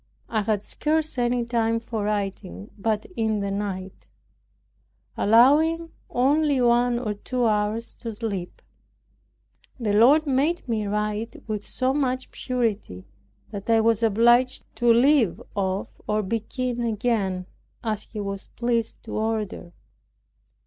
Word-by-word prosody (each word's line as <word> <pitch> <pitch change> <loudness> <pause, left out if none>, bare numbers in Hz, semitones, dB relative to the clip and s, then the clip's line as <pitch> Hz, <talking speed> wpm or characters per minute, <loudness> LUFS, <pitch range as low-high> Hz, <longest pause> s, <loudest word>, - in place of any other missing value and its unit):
I 220 -2 +1
had 210 -1 0
scarce 310 0 -1
any 240 0 +1
time 230 -1 +1
for 225 -2 -4
writing 195 - -3
but 215 +1 -1
in 220 -2 0
the 200 0 -2
night, 195 -2 -5 1.1
allowing 305 +9 +4 0.2
only 285 +2 +2
one 240 0 +3
or 225 -4 -2
two 245 +4 -2
hours 215 +1 0
to 230 - -5
sleep. 205 -5 -5 1.2
The 215 -4 0
Lord 270 +9 +6
made 285 +5 0
me 220 -3 -1
write 210 +2 -3
with 215 -2 -3
so 260 0 -1
much 260 -2 -1
purity, 220 - -2 0.5
that 200 0 -7
I 225 -1 +5
was 225 0 +2
obliged 240 +3 +3
to 240 0 +4
leave 240 - +4
off 195 -1 -1 0.2
or 215 0 +1
begin 235 +4 -2
again, 215 -5 0 0.4
as 215 -3 -1
He 215 - -9
was 200 -1 -5
pleased 235 -2 -1
to - - -9
order. 215 -5 -2
225 Hz, 130 wpm, -25 LUFS, 210-245 Hz, 1.2 s, Lord